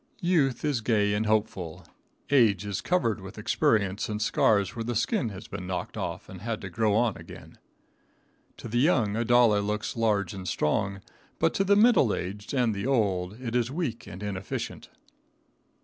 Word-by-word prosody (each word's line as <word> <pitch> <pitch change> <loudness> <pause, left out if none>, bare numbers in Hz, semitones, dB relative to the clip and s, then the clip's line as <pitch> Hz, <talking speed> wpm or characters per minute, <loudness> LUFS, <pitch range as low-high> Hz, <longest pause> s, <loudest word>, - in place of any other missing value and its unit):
Youth 155 -7 +2
is 140 -6 0
gay 105 -2 +2
and 105 +1 0
hopeful, 105 -6 -1 0.5
age 110 -8 +4
is 100 -2 -3
covered 115 - 0
with 95 0 -10
experience 100 -1 +1
and 105 0 -2
scars 100 -3 +2
where 115 - -3
the 120 +1 -3
skin 120 - 0
has 100 +1 -9
been 95 -2 -7
knocked 90 -1 -4
off - - -4
and 95 -1 -10
had 115 0 -3
to - - -7
grow 110 -3 +1
on 115 -2 +2
again. 85 0 -12 1.0
To - - -8
the 120 +2 0
young 120 - +2
a 115 - 0
dollar 120 -3 +4
looks 105 +1 -3
large 105 -5 +1
and 95 -2 -7
strong, 95 +5 0 0.4
but - - +2
to 195 - +1
the 200 +1 +4
middle 210 - +5
aged 100 +3 -6
and 125 -5 +1
the 100 +4 -3
old 100 -5 0
it 120 -2 -4
is 120 -1 +1
weak 140 -6 -4
and 95 +4 -8
inefficient. 100 -2 -5
110 Hz, 180 wpm, -27 LUFS, 100-120 Hz, 1.0 s, middle